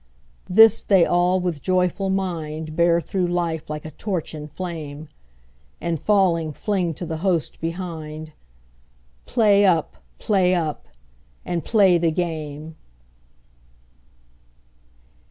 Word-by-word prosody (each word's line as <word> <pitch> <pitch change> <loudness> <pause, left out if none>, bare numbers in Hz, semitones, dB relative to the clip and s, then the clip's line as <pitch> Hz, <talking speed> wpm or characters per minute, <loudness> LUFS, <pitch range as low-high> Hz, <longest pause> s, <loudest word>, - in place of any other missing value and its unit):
This 220 +3 +6
they 190 -4 +4
all 175 +1 +2
with 180 -3 -2
a - - -15
joyful 185 +3 0
mind 160 -5 -3
Bear 170 0 +3
through 180 +3 -1
life 170 -3 -2
like 150 0 -5
a 155 - -7
torch 185 -5 -4
in 150 -1 -7
flame, 155 -2 -7 0.7
And 165 -3 -3
falling 170 -5 +2
fling 180 -2 -1
to 175 - -6
the 160 -1 -4
host 170 -2 -1
behind 160 -3 -6 0.9
"Play 210 -4 +4
up! 165 - +2 0.2
play 185 -3 +2
up! 160 -4 -3 0.6
and 170 -3 -2
play 195 -4 +4
the 165 0 +2
game!" 155 -2 -4
170 Hz, 120 wpm, -22 LUFS, 155-185 Hz, 0.9 s, This